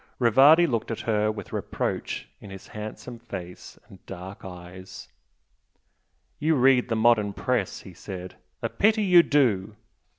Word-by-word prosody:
Rivardi 135 +8 +6
looked 120 -8 -2
at 115 - -4
her 110 -1 0
with 105 -3 -9
reproach - - -3
in 100 - -12
his 95 -1 -11
handsome 110 +2 -8
face 95 -6 -9
and 95 - -17
dark 95 +4 -9
eyes. 90 0 -11 1.3
"You 160 +1 +2
read 130 -1 +3
the 115 - 0
modern 110 -3 +3
Press" 120 -2 -2
he 95 - -12
said 90 0 -8 0.3
"A 115 - 0
pity 215 - +2
you 180 -3 +7
do!" 110 - +1
110 Hz, 140 wpm, -25 LUFS, 95-125 Hz, 1.3 s, you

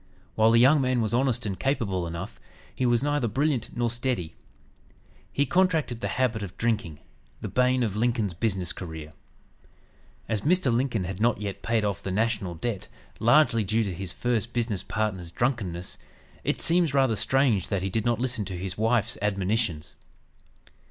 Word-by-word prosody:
While 110 0 +4
the 115 0 +5
young 140 +4 +6
man 130 -1 +1
was 110 -1 0
honest 125 -1 +1
and 95 -3 -3
capable 100 -10 0
enough, 85 0 -6 0.3
he 130 - 0
was 120 +1 +2
neither 145 -4 +1
brilliant 130 +1 -1
nor 120 0 +1
steady. 120 -8 -2 1.0
He 140 - +1
contracted 160 -7 +1
the - - -1
habit 125 -4 0
of 95 -2 -7
drinking, 110 -9 -1 0.4
the - - -4
bane 125 0 +2
of 105 -4 -1
Lincoln's 110 -3 0
business 95 -3 -1
career. 80 -4 -8 1.1
As 110 -3 -1
Mr. 160 - +2
Lincoln 120 -4 0
had 95 +3 -5
not 115 -2 +2
yet 100 -2 -5
paid 115 -2 +1
off 100 -3 -2
"the - - -4
national 105 -3 0
debt" 100 +4 -3 0.3
largely 120 -1 +4
due 110 +3 +1
to 100 -3 -3
his 90 0 -5
first 120 +1 -1
business 115 -5 -1
partner's 100 -5 -2
drunkenness, 95 -6 -2 0.4
it - - -1
seems 165 -4 +3
rather 135 -5 +3
strange 115 -2 +2
that 95 -2 -1
he 95 - -1
did 110 +2 0
not 120 -1 +1
listen 125 -3 -1
to 95 -3 -4
his 95 +2 -5
wife's 115 -1 +1
admonitions. 100 -5 -1
115 Hz, 170 wpm, -26 LUFS, 95-125 Hz, 1.1 s, young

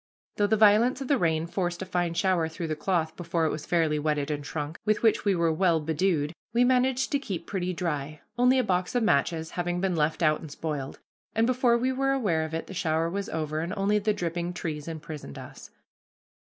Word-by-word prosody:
Though 205 - +3
the 220 - +2
violence 220 +5 +5
of 270 - -5
the 285 - +3
rain 160 -2 +1
forced 175 0 -2
a - - -6
fine 175 -2 -1
shower 175 -2 +2
through 165 0 -5
the 155 - -1
cloth 160 0 -1
before 170 -1 -1
it 155 - +1
was 155 - -6
fairly 160 -3 +2
wetted 150 -1 -1
and 145 -1 -3
shrunk, 150 +2 -5
with 215 +1 +1
which 225 -1 +3
we 200 -2 +3
were 170 -2 +2
well 170 -1 +3
bedewed, 160 0 0 0.2
we 240 +1 +4
managed 255 +1 +2
to 285 - +2
keep 190 -11 -5
pretty 185 -2 -2
dry, 155 -4 -3
only 250 +2 +4
a 255 - +3
box 180 +3 -1
of 245 - +2
matches 160 -1 +1
having 175 0 -2
been 190 -1 0
left 155 +2 0
out 155 -1 +3
and 160 - -8
spoiled, 145 -2 -4 0.4
and 225 +1 +3
before 250 -1 +3
we 255 +2 0
were 270 +1 +1
aware 195 -12 +1
of 160 0 -4
it 165 - -3
the - - -9
shower 165 -2 0
was 200 +1 -3
over, 155 -1 -2
and 170 +5 -3
only 205 +2 +2
the 210 +1 +1
dripping 175 -3 -3
trees 155 -3 -5
imprisoned 155 - -7
us. - - -10
175 Hz, 220 wpm, -27 LUFS, 160-205 Hz, 0.4 s, violence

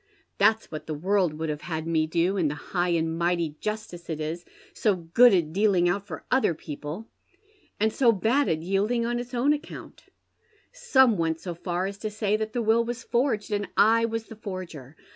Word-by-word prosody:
That's 215 +2 +3
what 155 - -7
the 155 - -3
world 180 0 +1
would 160 +1 -3
have 150 0 -3
had 160 -2 -4
me 160 -1 +1
do, 170 +4 +1
in 175 -6 +1
the 150 - -2
high 175 +4 -2
and 165 -1 0
mighty 170 -3 0
justice 210 -6 -5
it 160 -2 -3
is 160 +3 -4 0.3
so 210 -3 +1
good 180 +9 +5
at 165 -5 +1
dealing 195 -3 +3
out 200 +3 -1
for 160 -5 -8
other 255 -10 +3
people, 150 +8 -7 0.7
and 220 +1 +1
Bo 245 -4 +6
bad 230 +7 +1
at 160 0 -1
yielding 205 +6 0
an 240 +1 -1
its 245 +1 -6
own 270 +5 +3
account. 295 - -8 0.7
Some 265 - +3
went 165 -1 0
so 175 0 -5
far 175 +2 -3
as 200 +1 -5
to 215 - -3
say 210 -1 0
that 215 0 -2
the 240 - -1
will 225 +2 +3
was 240 +1 -5
forged, 235 -4 0
and 205 -1 -1
I 230 +2 +5
was 225 0 -3
the 225 - -11
forger. 185 - -8
195 Hz, 200 wpm, -26 LUFS, 165-225 Hz, 0.7 s, Bo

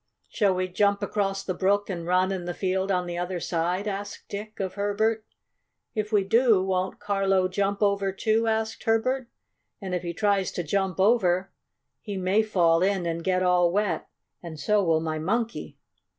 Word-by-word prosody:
"Shall 200 -4 +2
we 185 0 -1
jump 200 +2 +1
across 195 -1 -1
the 185 - -2
brook 200 +3 +1
and 170 -3 -5
run 185 +1 +2
in 185 -2 -3
the 175 - -4
field 190 0 -1
on 180 -1 +1
the 175 0 -4
other 180 0 -3
side?" 175 +4 -1
asked 200 0 -5
Dick 210 +1 -7
of 190 -2 -2
Herbert. 215 +2 0 0.7
"If 215 0 -3
we 205 -2 +3
do, 225 -1 +4
won't 185 -1 -1
Carlo 195 -2 +1
jump 200 +2 -1
over, 200 -1 +1
too?" 220 +3 +1
asked 220 0 -1
Herbert. 240 +3 +1 0.5
"And 190 -3 -5
if 180 - -1
he 170 -1 -4
tries 200 -2 +1
to 175 - -3
jump 190 +3 -1
over, 190 -3 +3 0.5
he 205 -3 -5
may 190 +3 +2
fall 175 -6 +2
in 190 -1 +1
and 165 0 -2
get 185 0 +1
all 180 -1 +3
wet, 205 +1 -1 0.3
and 165 -3 -8
so 205 +7 +2
will 165 -2 +2
my 155 -1 -2
Monkey." 225 +8 -2
195 Hz, 180 wpm, -26 LUFS, 180-205 Hz, 0.7 s, do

